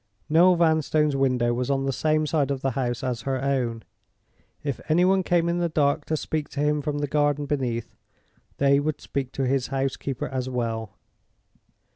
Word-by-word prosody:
Noel 175 +4 +6
Vanstone's 155 -3 +2
window 125 -3 +2
was 125 +2 -2
on 135 -1 +1
the 135 - 0
same 155 +2 +1
side 150 -3 +1
of 135 -2 -2
the 135 - 0
house 120 -1 -2
as 125 -2 -2
her 135 -1 -2
own. 125 -4 -1 0.8
If 140 -3 -3
any 170 +3 +4
one 190 +1 +3
came 175 -2 +1
in 170 +1 0
the 170 -1 0
dark 145 -1 +1
to 155 - -1
speak 155 0 -3
to 145 - -6
him 150 0 +1
from 145 0 -2
the 145 0 -1
garden 145 0 +1
beneath, 125 -6 -2 0.6
they 140 0 +4
would 150 +1 -2
speak 135 -2 -4
to 135 - -1
his 130 -1 0
housekeeper 135 0 -2
as 130 -1 -3
well. 115 -4 -3
140 Hz, 185 wpm, -25 LUFS, 130-155 Hz, 0.8 s, Noel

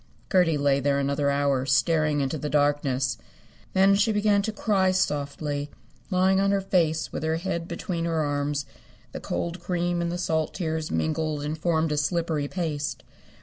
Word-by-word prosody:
Gertie 180 -5 +4
lay 140 -1 +2
there 140 0 +1
another 140 +1 0
hour, 140 -2 +1
staring 150 +1 +2
into 140 +3 -2
the 150 - -3
darkness. 145 -3 +1 0.5
Then 195 +1 +5
she 205 +2 +3
began 210 -1 +3
to 220 - -2
cry 200 -3 +1
softly, 145 -4 -1 0.4
lying 190 0 +3
on 195 0 +2
her 200 0 +2
face 170 -5 +1
with - - -3
her 160 +1 0
head 170 -1 -3
between 170 -1 -3
her 165 -2 0
arms. 145 0 -1 0.5
The - - -6
cold 170 +1 -3
cream 175 0 -1
and 170 0 -1
the 175 - -3
salt 160 -3 -1
tears 160 -3 -2
mingled 155 -2 -1
and 150 +1 -2
formed 160 -1 0
a 150 - 0
slippery 155 -1 0
paste. 155 -3 -3
160 Hz, 170 wpm, -26 LUFS, 145-180 Hz, 0.5 s, Then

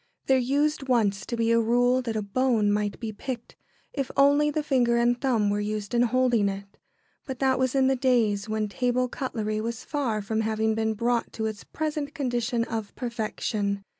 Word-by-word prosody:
There 265 -1 +4
used 280 +2 0
once 205 -6 +1
to 235 - -3
be 230 0 +2
a 230 - +4
rule 245 +3 +3
that 230 -3 -4
a 215 - -1
bone 220 -1 +1
might 205 -1 -1
be 225 -2 -4
picked, 240 +3 -6 0.4
if 275 -3 -2
only 285 +2 +5
the 300 +1 -1
finger 245 -5 +2
and 240 +1 +2
thumb 225 -7 +2
were 205 - 0
used 210 0 -3
in 240 - +3
holding 245 -4 +2
it. 195 +1 -7 0.5
But 265 -2 -4
that 265 0 +2
was 260 0 +1
in 265 -1 +4
the 265 0 +3
days 230 -6 +1
when 215 0 -1
table 250 +4 0
cutlery 215 -4 -3
was 230 0 -4
far 240 -8 -2
from 220 +2 -1
having 220 0 0
been 220 0 0
brought 235 +2 0
to 220 - -3
its 215 -1 -4
present 300 -1 -4
condition 245 -3 -1
of 225 -3 -5
perfection. 215 -4 -2
235 Hz, 195 wpm, -26 LUFS, 215-260 Hz, 0.5 s, only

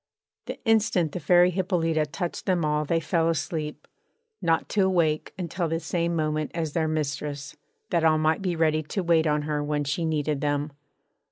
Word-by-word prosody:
The - - -5
instant 220 -8 +2
the 180 - -4
Fairy 175 +3 +5
Hippolyta 165 -4 0
touched 175 +3 -5
them 180 -2 +2
they 155 - +1
all 150 0 0 0.2
fell 165 -1 +1
asleep, 155 -1 -3 0.5
not 165 -1 +1
to 210 - +1
awake 165 -5 +1
until 175 -1 -2
the 165 +1 -1
same 170 +1 -1
moment 155 -1 -1
as 160 -3 -2
their 160 -2 +1
mistress, 145 -2 -3 0.4
that 165 - +2
all 160 -1 +4
might 155 +2 +1
be 180 -3 -1
ready 155 -1 +2
to 180 +5 -3
wait 165 -2 +3
on 150 0 +1
her 150 -1 -1
when 145 0 -1
she 145 +4 -2
needed 150 -3 -1
them. 145 0 -1
160 Hz, 180 wpm, -26 LUFS, 150-170 Hz, 0.5 s, Fairy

